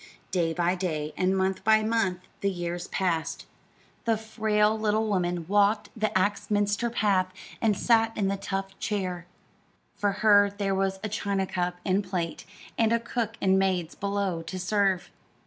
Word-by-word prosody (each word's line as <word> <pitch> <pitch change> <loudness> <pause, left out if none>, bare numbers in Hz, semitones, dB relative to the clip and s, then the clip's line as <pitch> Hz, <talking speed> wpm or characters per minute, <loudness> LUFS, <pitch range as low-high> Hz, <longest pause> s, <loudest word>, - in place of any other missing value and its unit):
Day 170 -3 +1
by 175 +1 +1
day 155 -5 -3
and 185 +1 +1
month 190 0 0
by 220 +1 +5
month 215 -5 0 0.2
the 200 - +1
years 175 -1 -4
passed. 170 -4 -1 0.6
The 225 -1 +2
frail 215 -1 +1
little 215 0 +1
woman 175 -4 -1
walked 205 +2 +2
the 215 -1 0
Axminster 205 +3 +1
path 200 -5 +2 0.3
and 215 -4 +2
sat 225 -1 +3
in 200 - +1
the 195 - 0
tufted 195 0 -4
chair. 185 -5 -3 0.7
For 205 -1 +1
her 205 -1 +7
there 200 -1 0
were 195 0 +1
a - - 0
china 200 -2 -1
cup 180 -1 -2
and 195 +2 +2
plate, 180 -3 -3 0.3
and 225 -1 +3
a 230 - +3
cook 230 -1 -3
and 190 0 +3
maids 185 -3 0
below 200 -4 -2
to 175 +3 -6
serve. 190 0 +1
195 Hz, 160 wpm, -27 LUFS, 185-210 Hz, 0.7 s, her